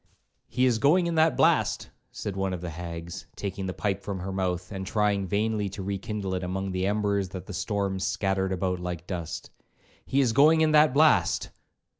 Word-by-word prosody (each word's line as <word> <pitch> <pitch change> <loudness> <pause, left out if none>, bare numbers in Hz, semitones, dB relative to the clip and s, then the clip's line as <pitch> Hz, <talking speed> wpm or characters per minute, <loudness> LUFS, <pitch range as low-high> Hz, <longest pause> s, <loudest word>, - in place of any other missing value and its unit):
'He 130 0 +1
is 120 -3 +2
going 165 +9 +4
in 170 - -1
that 160 0 +3
blast,' - - +2 0.2
said 100 - -5
one 95 -1 -1
of 85 - -8
the 90 -1 -5
hags, 85 +1 -7
taking 95 -1 -4
the 95 - -3
pipe 100 0 -1
from 95 -3 -5
her 95 +2 -4
mouth, 90 -1 -2
and 95 -2 -4
trying 100 0 0
vainly 105 +1 0
to 95 0 -7
rekindle 100 0 -3
it 90 0 -2
among 95 +2 -3
the 95 +1 -1
embers 100 -2 0
that 95 -1 -7
the 100 - -8
storm 100 0 -1
scattered 95 -1 0
about 90 0 -1
like 90 -1 -5
dust; 85 -4 -5 0.6
'he 135 - +1
is 125 -5 +3
going 155 +5 +6
in 155 -1 +4
that 150 -1 +6
blast.' 150 +3 +3
95 Hz, 195 wpm, -27 LUFS, 95-110 Hz, 0.6 s, going